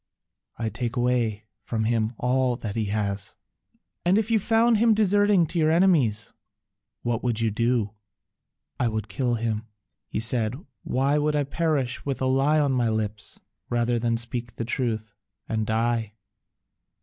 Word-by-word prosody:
"I 115 - -1
take 115 +3 -3
away 120 -4 0 0.2
from 110 +1 -2
him 110 0 +1
all 125 0 +1
that 110 -4 -5
he 110 -2 0
has." 100 -1 -2 0.7
"And 180 +3 +3
if 220 +1 0
you 225 - +4
found 225 +2 +3
him 225 0 +4
deserting 205 -3 +4
to 170 +2 -3
your 155 -1 +3
enemies, 160 - +3 0.7
what 120 -1 -1
would 120 -3 +1
you 115 -1 +1
do?" 115 -1 +1 0.9
"I 125 - +2
would 110 -1 -2
kill 120 +3 0
him," 110 -1 -2 0.4
he - - -3
said: 115 0 +1 0.3
"why 135 +3 +1
should 150 0 +1
I 145 - +2
perish 140 -3 -1
with 140 -2 -3
a 130 - 0
lie 135 +4 +3
on 145 -2 +2
my 125 -3 +1
lips 105 -2 -3 0.3
rather 120 0 +1
than 115 0 +1
speak 120 0 -4
the 115 - -3
truth 110 -3 -2 0.3
and 110 -1 -1
die?" 115 -1 0
120 Hz, 160 wpm, -25 LUFS, 110-145 Hz, 0.9 s, you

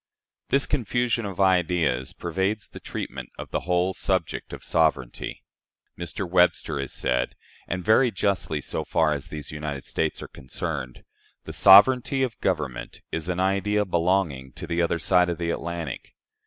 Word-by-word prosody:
This 140 +1 +3
confusion 120 -4 0
of 95 -2 -7
ideas 85 -9 +2
pervades 95 +5 -2
the - - -11
treatment - - -6
of - - -8
the - - 0
whole 90 +1 +2
subject 95 -4 -2
of - - -8
sovereignty. 75 -7 0 0.5
Mr. 85 +2 -4
Webster 90 -4 +2
has 70 -2 -3
said, 60 0 -1 0.3
and 90 0 -3
very 115 +4 +5
justly 95 -7 -1
so - - -3
far 80 -2 +2
as 70 -2 -5
these 75 -2 -6
United 75 -3 -5
States 80 -1 -1
are - - -7
concerned: 65 -1 -5 0.4
"The - - -8
sovereignty 125 +7 +6
of 120 -4 -3
government 75 -9 -2
is 80 +2 -3
an 90 0 -1
idea 100 +2 +1
belonging 85 -7 0
to - - -7
the 85 0 0
other 85 0 +1
side 90 +1 +3
of 85 - -2
the 85 0 -1
Atlantic. 85 -5 -5
85 Hz, 155 wpm, -25 LUFS, 75-95 Hz, 0.5 s, sovereignty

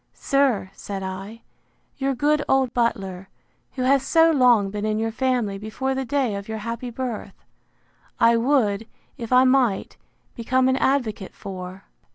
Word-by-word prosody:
—Sir, 270 -9 +1
said 195 -1 -6
I, 195 +4 -7 0.5
your 270 0 -1
good 295 +3 +2
old 265 -2 +2
butler, 195 -6 -2 0.4
who 255 - -3
has 270 +1 +4
so 325 +3 +4
long 245 -9 +4
been 210 0 -4
in 215 0 0
your 225 +1 -1
family 235 -5 -1
before 240 +6 -3
the 265 0 -3
day 265 -4 0
of 200 0 -6
your 220 0 -4
happy 230 +3 -5
birth, 240 -2 -6 0.7
I 230 0 +5
would, 230 -4 +1 0.3
if 230 -1 -6
I 255 0 +6
might, 255 -6 +1 0.4
become 255 +2 +1
an 260 0 +2
advocate 240 -9 -1
for! 185 0 -8
235 Hz, 155 wpm, -23 LUFS, 205-265 Hz, 0.7 s, I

